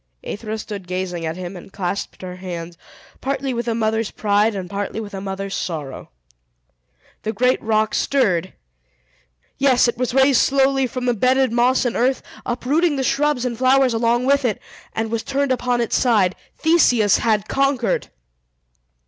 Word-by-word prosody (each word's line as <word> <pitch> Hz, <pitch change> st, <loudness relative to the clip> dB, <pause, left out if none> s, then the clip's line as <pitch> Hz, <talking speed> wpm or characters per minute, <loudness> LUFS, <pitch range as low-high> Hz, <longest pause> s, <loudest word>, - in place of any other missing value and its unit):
Aethra 215 Hz, +1 st, -5 dB
stood 205 Hz, -4 st, -7 dB
gazing 180 Hz, -2 st, -3 dB
at 160 Hz, +2 st, -4 dB
him, 185 Hz, +1 st, -6 dB
and 180 Hz, +2 st, -11 dB
clasped 195 Hz, 0 st, -4 dB
her 180 Hz, 0 st, -7 dB
hands, 175 Hz, -2 st, -6 dB, 0.5 s
partly 275 Hz, 0 st, -2 dB
with 235 Hz, 0 st, -3 dB
a 230 Hz, -, 0 dB
mother's 220 Hz, -1 st, 0 dB
pride, 210 Hz, +1 st, +1 dB
and 190 Hz, -2 st, -4 dB
partly 200 Hz, +3 st, -4 dB
with 210 Hz, -2 st, -7 dB
a 195 Hz, -, -5 dB
mother's 195 Hz, 0 st, -4 dB
sorrow. 150 Hz, -6 st, -5 dB, 1.1 s
The 220 Hz, -, -2 dB
great 250 Hz, +4 st, +1 dB
rock 220 Hz, -1 st, +1 dB
stirred! 190 Hz, -10 st, +1 dB, 1.1 s
Yes, 260 Hz, -3 st, +4 dB
it 240 Hz, -, -2 dB
was 250 Hz, 0 st, -1 dB
raised 270 Hz, -1 st, +5 dB
slowly 270 Hz, -1 st, +2 dB
from 250 Hz, 0 st, -5 dB
the 245 Hz, -, +2 dB
bedded 255 Hz, +3 st, +2 dB
moss 250 Hz, +2 st, +3 dB
and 240 Hz, -, -1 dB
earth, 255 Hz, +2 st, +1 dB, 0.2 s
uprooting 290 Hz, +7 st, +1 dB
the 270 Hz, -, -1 dB
shrubs 285 Hz, -1 st, +1 dB
and 245 Hz, -2 st, -2 dB
flowers 260 Hz, +1 st, +3 dB
along 235 Hz, +2 st, +1 dB
with 280 Hz, +1 st, +3 dB
it, 230 Hz, -5 st, 0 dB, 0.3 s
and 225 Hz, 0 st, -2 dB
was 230 Hz, -1 st, -1 dB
turned 275 Hz, +1 st, -1 dB
upon 250 Hz, -1 st, 0 dB
its 235 Hz, -, 0 dB
side. 210 Hz, -7 st, +3 dB, 0.2 s
Theseus 245 Hz, -, +4 dB
had 215 Hz, -2 st, +1 dB
conquered! 275 Hz, -4 st, 0 dB
230 Hz, 165 wpm, -21 LUFS, 200-260 Hz, 1.1 s, raised